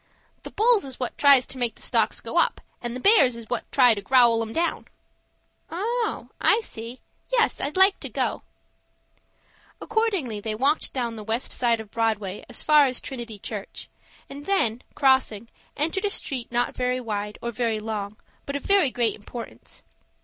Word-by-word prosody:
"The - - -8
bulls 455 0 +3
is 265 -2 -8
what 250 - -3
tries 280 -3 +6
to 265 - -7
make 235 -3 -1
the - - -18
stocks - - 0
go - - -1
up, - - +2 0.2
and 240 0 -4
the - - -4
bears 275 - +5
is 230 -1 -10
what - - -3
try 250 -4 +6
to 205 - -5
growl 235 0 +4
'em 225 -1 -4
down." 335 +7 -1 0.8
"Oh, 450 +7 -2
I 440 - +4
see. 235 - -8 0.3
Yes, 480 -2 +2
I'd 290 +5 -2
like 385 +1 +5
to - - -7
go." - - -2 1.4
Accordingly 390 - -1
they 215 +1 -4
walked 280 +7 +1
down 255 -3 -1
on 230 -1 -5
the 215 - -7
west 225 +4 -3
side 235 -2 +1
of 215 -2 -9
Broadway 215 -4 -1
as 245 - -4
far 300 -2 +6
as 255 -1 -2
Trinity 235 -5 -7
Church, 205 0 -7 0.4
and 285 +1 -10
then, 245 - +1
crossing, 260 -6 +2 0.3
entered 330 +7 0
a - - +2
street 260 - -4
not 240 +1 0
very 250 0 0
wide 210 -3 -4
or 235 - -4
very 230 -2 -1
long, 215 -1 -5 0.3
but 280 - -3
of 280 - -3
very 395 -8 +4
great 240 -2 0
importance. 230 +3 -10
245 Hz, 180 wpm, -25 LUFS, 225-290 Hz, 1.4 s, tries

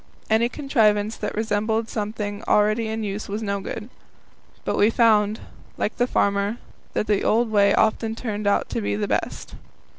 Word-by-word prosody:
Any 230 +2 +3
contrivance 220 -7 +1
that 210 - -4
resembled 220 +1 0
something 210 -1 -4
already 215 +2 +3
in 220 0 -3
use 205 0 -4
was 210 +2 -3
no 200 -1 -1
good. 210 +2 -6 0.8
But - - 0
we 205 - +4
found, 220 -2 +3 0.4
like 210 - -2
the 245 - +2
farmer, 200 0 +1 0.4
that - - 0
the 210 -2 +1
old 230 +1 +2
way 200 -1 +4
often 220 0 +1
turned 215 -3 -3
out 200 - +2
to 115 - -2
be 100 0 -1
the 105 - -2
best. - - -3
215 Hz, 170 wpm, -23 LUFS, 205-225 Hz, 0.8 s, we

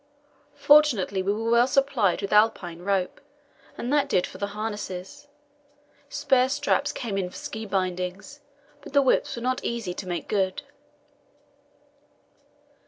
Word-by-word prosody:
Fortunately 285 -10 +4
we 195 +2 0
were 225 +2 -1
well 235 +1 +5
supplied 270 -9 +1
with 200 - -2
Alpine 205 -5 +2
rope, 190 -1 -1 0.6
and 250 +4 -3
that 290 -1 +2
did 180 - +2
for 185 - -11
the 200 - -1
harness; 210 +5 -6 0.8
spare 265 -3 +2
straps 285 +1 0
came 215 -6 -3
in 180 -2 -2
for - - -15
ski 220 0 -6
bindings, 185 +7 -3 0.4
but 280 - -12
the 280 - +5
whips 270 +1 +1
were 235 - -6
not 255 0 0
so - - -4
easy 230 -6 -3
to 185 - -7
make 175 -1 -4
good. 190 +3 -1
215 Hz, 145 wpm, -25 LUFS, 190-270 Hz, 0.8 s, well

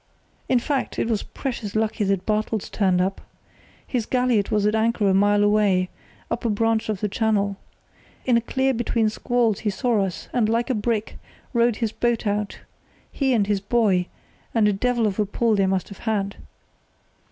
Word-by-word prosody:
"In 255 - +4
fact, 270 +3 -2
it - - 0
was 220 -3 0
precious 235 -7 -5
lucky 220 -1 0
that 195 -1 0
Bartels 215 -1 -1
turned 185 -3 +2
up. 190 +2 -1 0.6
His 240 -4 -2
galliot 250 -5 +1
was 210 -1 +1
at 210 - +2
anchor 220 -1 +1
a 190 - +4
mile 205 +1 +4
away, 205 -3 +3 0.4
up 230 - -2
a 235 - +1
branch 220 +1 +1
of 210 -3 -2
the 210 - +1
channel. 205 -2 0 0.7
In 250 - +3
a 235 - +3
clear 265 +3 0
between 230 -2 +1
squalls 230 -1 0
he 215 - -1
saw 215 +1 +1
us, 185 -2 -5
and, 225 -3 +2
like 235 +3 +1
a - - +2
brick, 220 -1 -2 0.3
rowed 235 -1 +3
his 225 -1 -2
boat 240 0 0
out—he 210 +6 -4
and 220 -5 +3
his 200 -1 0
boy, 200 -4 +2 0.5
and 220 -2 +4
a 205 - +3
devil 240 +3 +1
of 205 -1 -1
a 210 - +3
pull 225 +2 +1
they 195 -1 +2
must 190 -1 -1
have 200 - -11
had. 200 -3 -1
215 Hz, 185 wpm, -23 LUFS, 200-235 Hz, 0.7 s, In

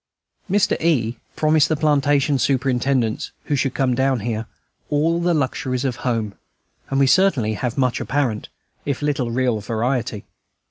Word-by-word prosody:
Mr. 200 +1 +2
E. 120 -8 +1 0.2
promised 155 -1 +3
the 160 - +2
plantation 145 -1 +2
superintendents 130 -3 0
who 150 - -1
should 135 -1 -1
come 130 -2 +1
down 130 -1 +1
here 110 0 -3 0.4
"all 160 +3 +1
the 175 0 +2
luxuries 130 -2 -1
of 125 -3 -1
home," 115 -5 -2 0.6
and 135 - 0
we 140 - +5
certainly 135 - +3
have 120 +4 -3
much 130 -3 +1
apparent, 130 -7 -1 0.3
if 140 0 -3
little 140 -5 0
real 125 -2 0
variety. 115 0 -2
130 Hz, 145 wpm, -21 LUFS, 120-145 Hz, 0.6 s, we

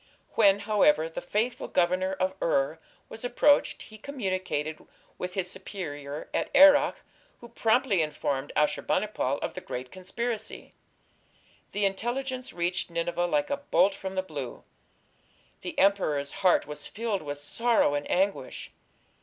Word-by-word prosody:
When, 200 -2 +5
however, 200 -7 +3
the 165 - -6
faithful 225 +7 -1
governor 185 +2 +1
of 190 0 -1
Ur 155 0 +1 0.3
was 225 - -10
approached, 265 +4 +3
he 215 0 -13
communicated 185 - -3 0.4
with 180 0 -4
his 185 -2 -1
superior 145 -7 -6
at - - 0
Erech, 290 0 +7 0.4
who 235 - -12
promptly 225 -4 +2
informed 145 -2 -2
Ashur 150 0 +2
bani - - +1
pal 140 -10 -1
of - - -3
the - - -6
great 125 0 -6
conspiracy. 220 +5 -4 1.0
The 205 0 0
intelligence 250 +6 -2
reached 175 +1 -1
Nineveh 170 +1 -1
like 150 - 0
a 285 - +1
bolt 240 -8 +3
from 190 0 -6
the 185 - 0
blue. 145 -8 -7 1.0
The - - -6
emperor's 155 -8 +2
heart 190 -2 +3
was 150 0 -4
filled 220 -2 -2
with 145 -1 -5
sorrow 225 +4 +2
and 145 0 -2
anguish. 195 +2 -1
190 Hz, 140 wpm, -28 LUFS, 155-220 Hz, 1.0 s, Erech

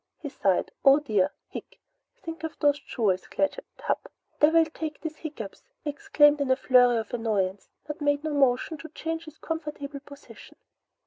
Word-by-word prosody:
He 295 - -5
sighed. 195 -8 +1
"Oh 275 0 +8
dear! 210 -10 +1 0.2
Hic! - - -9 0.4
Think 330 0 -7
of 320 - -5
those 290 -1 +3
jewels, 205 -9 -1
Claggett! 290 - -1 0.2
Hup! - - -2 0.3
Devil 320 +2 +6
take 315 -1 -6
these 315 -1 -6
hiccups!" 290 -11 -7 0.2
he 295 - -1
exclaimed 295 -5 +4
in 275 - 0
a 260 - +5
flurry 245 -2 +5
of 225 +1 -4
annoyance, 205 -5 -1 0.2
but 300 0 -6
made 290 0 +1
no 310 -1 -2
motion 275 +2 +2
to 320 - -9
change 325 +1 -4
his 310 0 -12
comfortable 300 -3 -5
position. 280 0 -14
290 Hz, 170 wpm, -27 LUFS, 245-315 Hz, 0.4 s, Oh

